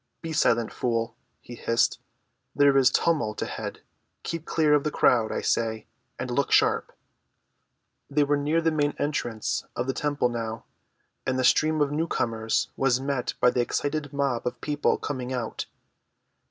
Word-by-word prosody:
"Be 165 -1 -4
silent, 120 -7 +2
fool," 115 -1 -1 0.3
he 120 - -11
hissed. 115 0 +1 0.6
"There 140 -1 +5
is 135 -2 +6
tumult 135 -12 +1
ahead. - - -6 0.4
Keep 165 -1 -4
clear 155 -2 +2
of 145 -1 +4
the 150 - 0
crowd, 115 -6 +3
I - - -2
say, 110 -1 0 0.3
and - - -4
look - - 0
sharp!" - - +3 1.2
They 145 +1 +3
were 145 +1 +2
near 150 +3 +1
the 165 0 +2
main 145 -2 0
entrance 120 -5 -2
of 120 - -1
the 130 - -1
temple 145 -4 0
now, 115 -1 -4 0.6
and 130 0 +1
the 130 - +1
stream 155 +3 +3
of 145 -1 +2
newcomers 120 -7 -1
was 130 -2 +2
met 135 -2 -2
by 125 - +5
an 125 - -1
excited 145 +4 -1
mob 140 -4 -1
of - - -4
people 150 -1 0
coming 130 -3 -4
out. 120 -3 -4
135 Hz, 160 wpm, -26 LUFS, 120-145 Hz, 1.2 s, is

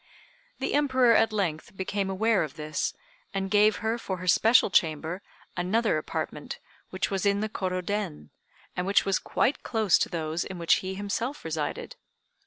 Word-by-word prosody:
The - - -2
Emperor 260 -5 +4
at 225 0 +4
length 185 -3 -2
became 195 +1 -2
aware 215 +2 +2
of 155 -5 -4
this, 155 0 -2 0.4
and 195 0 -2
gave 210 0 +5
her, 225 +2 0
for 190 -4 -4
her 180 - -7
special 220 +4 +5
chamber, 160 +2 +1 0.3
another 185 0 +1
apartment, - - -5 0.3
which 185 +1 -2
was 195 -1 -1
in 200 0 +2
the 215 - -1
Kôrô 185 -3 -3
Den, 75 - -3 0.4
and 180 +1 -2
which 200 0 +3
was 195 -1 +1
quite 270 - 0
close 220 -7 +2
to - - 0
those 165 -1 -2
in 190 - -7
which 170 -1 +3
he 190 0 -4
himself 205 - -3
resided. 160 -2 -4
195 Hz, 170 wpm, -27 LUFS, 170-215 Hz, 0.4 s, gave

